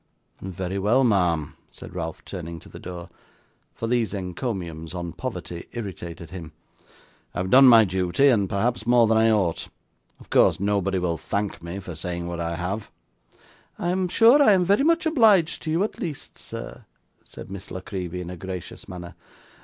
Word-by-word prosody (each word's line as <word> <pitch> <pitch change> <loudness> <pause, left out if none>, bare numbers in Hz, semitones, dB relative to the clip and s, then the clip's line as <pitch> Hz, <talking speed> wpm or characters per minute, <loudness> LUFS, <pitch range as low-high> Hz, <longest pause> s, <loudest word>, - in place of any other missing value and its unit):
'Very 95 +1 -4
well, 115 +7 +3
ma'am,' 90 - +1
said - - -12
Ralph, - - -5
turning 85 +1 -6
to - - -14
the - - -11
door, 90 -1 -7 0.7
for - - -4
these 115 -2 0
encomiums 90 -4 -4
on 85 -1 -4
poverty 90 -8 -6
irritated 85 -7 -7
him; 85 -4 -8 0.8
'I - - -4
have 95 +1 -1
done 135 +1 +9
my 115 -3 +8
duty, 95 +8 +2
and 100 -7 +2
perhaps 110 +2 -1
more 120 -1 +6
than 110 0 +3
I 115 0 +4
ought: 95 -7 +1 0.5
of - - -17
course - - +4
nobody 100 -1 0
will 85 -2 -1
thank 100 0 -3
me 85 +3 -6
for 95 -3 -7
saying 85 +2 -4
what 85 0 -4
I 85 0 -2
have.' 95 +5 -4 0.9
'I 175 - -2
am 185 0 0
sure 235 +10 +6
I 215 -7 +7
am 185 -2 +3
very 200 +8 +3
much 335 +2 +3
obliged 220 - +4
to - - -5
you 165 +5 +2
at 215 - -4
least, 155 -5 -5
sir,' 65 +1 -8 0.4
said - - -11
Miss 100 0 -8
La 95 - -6
Creevy 90 -2 -5
in 90 0 -6
a 90 - -7
gracious 90 -1 -7
manner. 90 -1 -8
95 Hz, 180 wpm, -24 LUFS, 85-120 Hz, 0.9 s, done